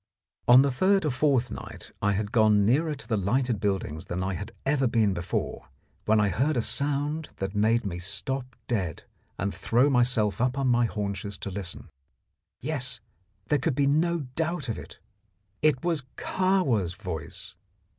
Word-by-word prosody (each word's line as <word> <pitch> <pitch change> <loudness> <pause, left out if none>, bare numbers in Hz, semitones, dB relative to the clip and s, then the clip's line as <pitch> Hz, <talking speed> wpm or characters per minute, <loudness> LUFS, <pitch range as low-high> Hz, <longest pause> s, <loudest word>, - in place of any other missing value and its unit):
On 125 +2 +9
the 140 - +1
third 190 +7 +3
or 150 - +1
fourth 130 -2 +2
night - - -8
I 100 0 +2
had 100 +1 -2
gone 110 -4 +4
nearer 150 +7 +2
to 140 - -12
the 110 -2 +1
lighted 120 +3 +1
buildings 95 -6 -2
than 90 +1 -3
I 95 +1 -1
had 100 +3 -5
ever 135 -1 +2
been 110 -4 +2
before, 90 +1 -3 0.4
when 110 0 +4
I 105 -1 +3
heard 130 - +1
a - - +3
sound 145 +4 -1
that 95 0 -4
made 110 +2 +2
me 90 -3 -3
stop 125 +7 -3
dead 95 - -2 0.3
and 100 +2 -2
throw 125 +5 +2
myself 120 -5 +2
up 125 +2 +1
on 135 -2 +1
my 120 0 +4
haunches 100 -2 -3
to 100 - -5
listen. 95 -2 -6 0.7
Yes, 130 -4 -2 0.5
there 145 - +3
could 135 +1 0
be 140 - +2
no 165 +4 +2
doubt 160 -3 -2
of 110 - -2
it! - - -11 0.6
It 155 -1 +2
was 165 -4 +1 0.2
Kahwa's 140 - +1
voice. 85 -5 -7
120 Hz, 170 wpm, -27 LUFS, 100-140 Hz, 0.7 s, On